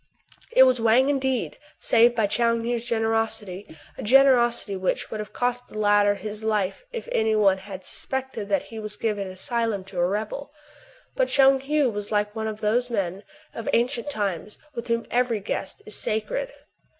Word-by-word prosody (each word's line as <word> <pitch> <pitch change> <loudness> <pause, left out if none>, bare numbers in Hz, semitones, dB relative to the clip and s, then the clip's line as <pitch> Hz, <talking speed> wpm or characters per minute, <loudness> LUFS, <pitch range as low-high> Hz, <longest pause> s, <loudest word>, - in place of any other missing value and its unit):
It 260 - +7
was 255 -2 +3
Wang 235 +4 +4
indeed, 265 -3 -1 0.2
saved 235 +1 +4
by 220 -3 +2
Tchoung 230 +2 +1
Heou's 240 0 -1
generosity, 225 -6 -2
— - - -28
a - - -3
generosity 240 -4 +4
which 185 -1 -2
would 220 - -4
have 210 - -6
cost 245 0 -2
the - - -10
latter 205 -1 +4
his 210 +2 -7
life 210 - -1
if 475 -1 -6
any 220 - +2
one 195 -3 +3
had 190 -1 -9
suspected 265 -6 -4
that 195 - +1
he 225 - -5
was 215 -1 -6
giving 210 -3 -2
an - - -7
asylum 220 +1 -1
to 190 -1 -7
a 175 - +3
rebel. 215 +9 -4 0.6
But - - +2
Tchoung 270 0 +5
Heou 295 -5 +3
was 205 0 -5
like 210 0 0
one 220 0 -2
of 215 -1 -5
those 240 +4 +1
men 195 -4 -2 0.3
of 230 - -5
ancient 245 +3 +1
times 205 - -3 0.2
with 235 -2 -6
whom 230 0 0
every 245 -2 +1
guest 195 -1 -4
is 215 - -1
sacred. - - -2
220 Hz, 185 wpm, -25 LUFS, 205-245 Hz, 0.6 s, It